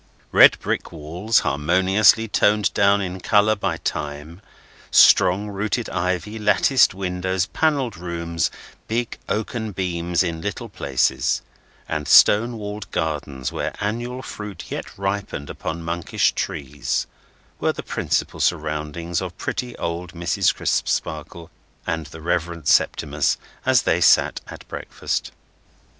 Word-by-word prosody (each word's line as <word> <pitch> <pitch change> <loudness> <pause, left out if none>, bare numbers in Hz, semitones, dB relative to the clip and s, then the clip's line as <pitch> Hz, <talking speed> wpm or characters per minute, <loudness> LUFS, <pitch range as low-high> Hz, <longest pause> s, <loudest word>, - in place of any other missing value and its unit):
Red - - +7
brick - - -3
walls 85 +8 0
harmoniously 95 +10 +3
toned 105 0 +2
down 100 0 +3
in 95 -1 -4
colour 105 +3 +3
by 100 - -2
time, 75 +5 -5 0.5
strong 100 +4 +5
rooted 105 +4 -2
ivy, 90 +5 -2
latticed 105 +2 +4
windows, 95 -1 -1
panelled 140 -5 0
rooms, 85 -1 -2 0.4
big 115 +1 -2
oaken 110 0 -2
beams 90 -1 0
in 85 -2 -3
little 115 +5 -4
places, 70 -9 0 0.4
and 75 -1 -3
stone 115 +3 +6
walled 105 -1 -6
gardens 70 -4 -3
where - - -3
annual 120 +5 -3
fruit 105 -5 -8
yet - - -4
ripened 100 -7 -3
upon 85 +1 -5
monkish 85 0 0
trees, 70 -2 -3 0.5
were - - +1
the - - -7
principal - - -2
surroundings 80 +1 -1
of - - -6
pretty 125 -1 -4
old 85 0 -4
Mrs. 85 -1 +1
Crisparkle 80 +2 -2 0.3
and 80 -2 -3
the 80 +3 -11
Reverend 85 -2 -2
Septimus 75 -1 +2 0.3
as - - +4
they - - +1
sat - - +4
at - - -11
breakfast. - - -4
90 Hz, 120 wpm, -22 LUFS, 80-105 Hz, 0.5 s, Red